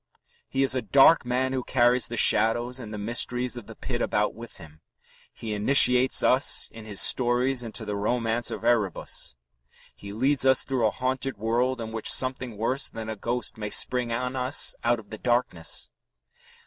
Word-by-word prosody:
He 135 0 0
is 135 - +3
a 130 - -1
dark 135 +5 +4
man 130 +1 -1
who 130 - -1
carries 120 0 +2
the 120 - -6
shadows 120 +4 +3
and 110 -4 -9
the 105 - -6
mysteries 120 +3 -2
of 120 -4 -9
the - - -11
pit - - -5
about 105 0 0
with 115 +1 -11
him. 80 -3 -15 0.5
He 110 -2 -7
initiates 125 +3 +4
us 130 +2 +3
in 115 -1 -11
his 105 -4 -3
stories 125 +5 +3
into 115 -1 -7
the 105 -1 -4
romance 115 +2 -1
of - - -7
Erebus. 110 - -1 0.6
He 100 - -10
leads 130 +6 0
us 130 -1 +4
through 130 -4 0
a - - +1
haunted 130 +2 -3
world 120 +4 -1
in 110 -1 -6
which 110 -1 -3
something 130 -3 0
worse 125 +5 -1
than 110 0 -8
a 110 - -4
ghost 120 +2 -4
may 105 -1 -4
spring 125 +2 +2
on 125 +2 -3
us 130 +2 -2
out 120 0 +1
of 110 - -16
the 110 - -8
darkness. 120 -9 -2
120 Hz, 185 wpm, -25 LUFS, 110-130 Hz, 0.6 s, dark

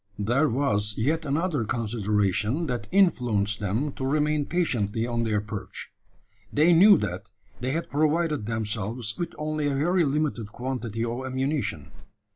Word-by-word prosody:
There 120 +9 +2
was 105 -5 0
yet 155 +8 0
another 150 -1 0
consideration 105 - 0
that 125 -5 -3
influenced 120 - +2
them 110 +9 -1
to 135 - -7
remain 150 +1 +1
patiently 115 - 0
on 120 -1 -1
their 105 -2 +1
perch. 105 -1 -7 0.6
They 160 +4 +4
knew 195 +4 +8
that - - -4 0.3
they 125 - -2
had 165 +5 -2
provided 155 -4 +1
themselves 110 0 -3
with 170 - -3
only 155 -1 -1
a 140 - 0
very 175 +6 +2
limited 140 -7 -1
quantity 120 -3 -3
of 120 +3 -3
ammunition. 135 +3 -2
130 Hz, 140 wpm, -26 LUFS, 110-155 Hz, 0.6 s, knew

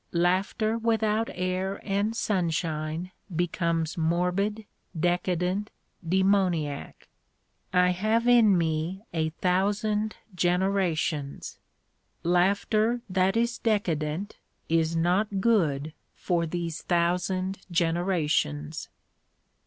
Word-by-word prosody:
Laughter 190 +6 +1
without 225 -1 +1
air 185 +2 -2
and 205 +2 0
sunshine 165 -4 -1 0.2
becomes 170 -1 -1
morbid, 180 +6 0 0.3
decadent, 180 +3 0 0.3
demoniac. 180 -5 0 0.6
I 180 0 +4
have 215 +6 +1
in 230 -6 +6
me 165 +4 -1
a 160 -1 0
thousand 205 +5 0 0.2
generations. 175 -5 0 0.6
Laughter 200 +6 +2
that 190 +3 +2
is 235 +1 0
decadent 180 -4 -1 0.3
is 165 0 +2
not 190 +5 +1
good 160 -9 +1 0.2
for 170 -2 0
these 170 -1 -4
thousand 180 +2 0
generations. 165 - 0
180 Hz, 80 wpm, -27 LUFS, 165-200 Hz, 0.6 s, in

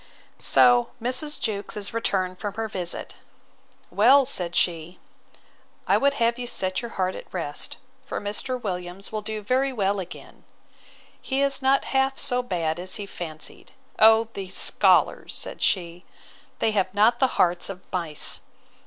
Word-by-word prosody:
So, 245 -1 +5
Mrs. 255 +6 -1
Jewkes 205 -1 -3
is 205 0 -4
returned 185 -5 -1
from 205 -2 -4
her 225 0 -2
visit: 180 -4 -4 0.7
Well, 275 0 +6
said 175 -10 0
she, 170 0 0 0.9
I - - +3
would 280 0 +2
have 235 -2 +1
you 245 - -4
set 185 -4 -1
your 235 - -6
heart 185 -1 0
at - - -10
rest; 165 -5 -5 0.3
for - - -3
Mr. 210 +5 -4
Williams 180 -2 -5
will 215 -1 -3
do 215 0 -5
very 260 +5 +1
well 200 -4 0
again. 185 - -10 0.8
He 270 0 0
is 275 0 +1
not 270 +1 +3
half 270 0 +2
so 250 0 +1
bad 175 -8 -2
as 185 +1 -2
he 205 - -5
fancied. 160 -5 -8 0.3
O 220 +1 +7
these 190 -2 -4
scholars, - - +3
said - - -4
she, 175 -1 0 0.5
they 220 - +1
have 195 -3 0
not 225 +4 +4
the 265 -2 +1
hearts 175 +1 +2
of 195 -2 -6
mice! 165 -5 -1
205 Hz, 155 wpm, -25 LUFS, 185-245 Hz, 0.9 s, O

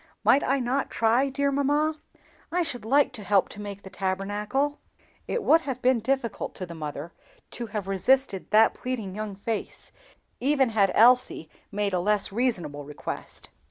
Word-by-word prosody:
Might 280 - +5
I 275 +1 +1
not 255 +2 -1
try, 235 +5 +2
dear 280 +1 0
mamma? 295 +3 +1 0.5
I 355 +1 +1
should 245 -9 -5
like 275 +3 +3
to 220 -4 -8
help 200 -1 +2
to 210 - -9
make 200 -1 -7
the 190 - -9
Tabernacle." 205 +9 -2 0.5
It 480 - -2
would 325 +2 +5
have 265 -5 -4
been 255 -1 +3
difficult 250 -1 -2
to 185 - -4
the 170 - -9
mother 155 0 -6 0.4
to 235 - -5
have 210 -2 -4
resisted 195 +2 +1
that 220 +1 +5
pleading 230 -7 -4
young 210 -1 -5
face, 215 +2 -5 0.5
even 270 -1 +3
had 205 -4 +2
Elsie 240 -8 +4 0.2
made 205 -1 -1
a 180 - +2
less 205 +2 +1
reasonable 185 - -1
request. 145 +1 -7
225 Hz, 165 wpm, -26 LUFS, 195-270 Hz, 0.5 s, Might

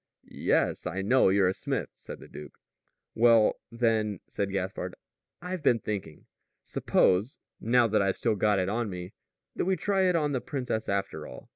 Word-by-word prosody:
"Yes, - - 0
I 95 +2 -3
know 125 +1 +4
you're 95 -1 +3
a - - 0
smith," - - -3
said - - -10
the - - -12
duke. 75 - -11 0.6
"Well, 115 -2 +4
then," 110 -3 0
said 100 -1 -3
Gaspard, 95 0 -3 0.5
"I've 180 -1 -4
been 125 -5 +4
thinking. 105 -4 -6 0.4
Suppose 100 +8 +1 0.2
now 120 +2 +3
that 105 -1 +2
I've 100 -1 0
still 115 -3 +1
got 105 0 +2
it 95 -1 0
on 110 +2 -1
me 90 0 -7 0.4
that - - -1
we 190 +1 +2
try 195 +2 +1
it 180 - +1
on 150 -3 +1
the 130 -3 -1
princess, 125 -5 -3
after 100 0 -2
all." - - -12
110 Hz, 175 wpm, -28 LUFS, 95-125 Hz, 0.6 s, know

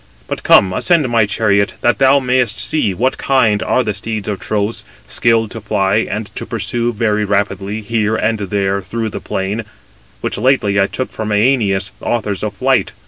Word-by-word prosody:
But - - -4
come, 95 -1 +5
ascend 165 - +2
my 115 -3 +3
chariot, 100 -1 +1
that 120 - +2
thou 135 +1 +5
mayest 125 -4 0
see 150 -10 0
what 120 +8 -1
kind 110 -7 +2
are 130 +6 +1
the 105 - -2
steeds 110 0 -4
of 100 -3 -3
Tros, 105 +3 -2 0.2
skilled 115 -2 +1
to 115 - -7
fly 100 -1 +1
and 110 +1 -3
to - - -4
pursue 115 +1 -1
very 105 -2 0
rapidly, 100 +1 -1
here 110 0 0
and 110 0 0
there, 100 0 -1
through 115 +3 -3
the - - -6
plain; 100 +4 -3 0.6
which - - -3
lately 105 -5 +2
I 100 - +3
took 130 - -4
from 110 -1 -4
Æneas, 105 -4 +2
authors 105 -5 -2
of 105 -1 -3
flight. - - +1
105 Hz, 180 wpm, -16 LUFS, 100-115 Hz, 0.6 s, come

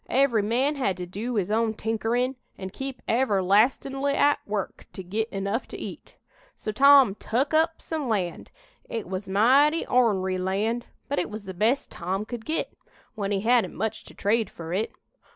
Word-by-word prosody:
Every 255 -4 +3
man 255 +8 +1
had 195 -9 0
to 180 - -4
do 215 +7 -4
his 200 -1 0
own 220 0 +1
tinkerin', 225 +4 -1 0.2
an' 190 -1 -6
keep 270 +3 -6
everlastin'ly 245 +5 +2
at 290 0 +3
work 205 -2 -4
to 190 - -7
git 215 +5 -2
enough 200 +3 -2
to - - -8
eat. - - -9 0.4
So 215 - -4
Tom 275 -1 +7
tuk 250 +8 -1
up 320 +1 +2
some 310 -6 -3
land. 185 -6 -2 0.4
It 225 -5 -4
was 190 +1 -5
mighty 270 +11 +4
ornery 190 -7 +2
land, 210 +6 -1 0.2
but 285 - 0
it - - -2
was 215 0 -7
the 190 -1 -7
best 225 +9 +1
Tom 190 +4 -3
could 235 -1 -7
git, 320 +1 -2 0.4
when 205 -2 -3
he 195 -1 0
hadn't 235 +2 +2
much 220 0 -3
to - - -13
trade 220 +2 +1
fur 165 0 -7
it. 205 +4 -1
220 Hz, 175 wpm, -26 LUFS, 195-260 Hz, 0.4 s, Tom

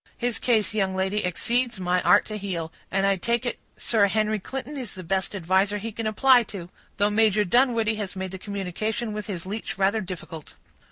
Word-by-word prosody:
His 240 -1 -1
case, 215 -5 +2
young 195 -3 0
lady, 190 +2 0
exceeds 235 +5 0
my 180 0 +1
art 180 +4 +5
to 215 - -6
heal; 180 -6 -4 0.2
and 195 +1 +1
I 195 -1 +3
take 235 +6 0
it 240 - -2 0.2
Sir 215 -3 +3
Henry 215 +1 +1
Clinton 270 +8 -6
is 255 -6 -6
the 185 - -7
best 190 +3 -1
adviser 190 +3 +2
he 225 +3 -5
can 225 +1 -3
apply 250 +3 +5
to; 180 -5 -8 0.3
though 205 +1 +2
Major 210 -1 +3
Dunwoodie 230 0 +3
has 200 -3 -4
made 190 -1 -4
the 190 - -6
communication 210 +3 -3
with 210 0 -5
his 185 -5 -5
leech 210 +4 -5
rather 200 +3 +2
difficult." 175 -4 -8
205 Hz, 200 wpm, -25 LUFS, 190-220 Hz, 0.3 s, art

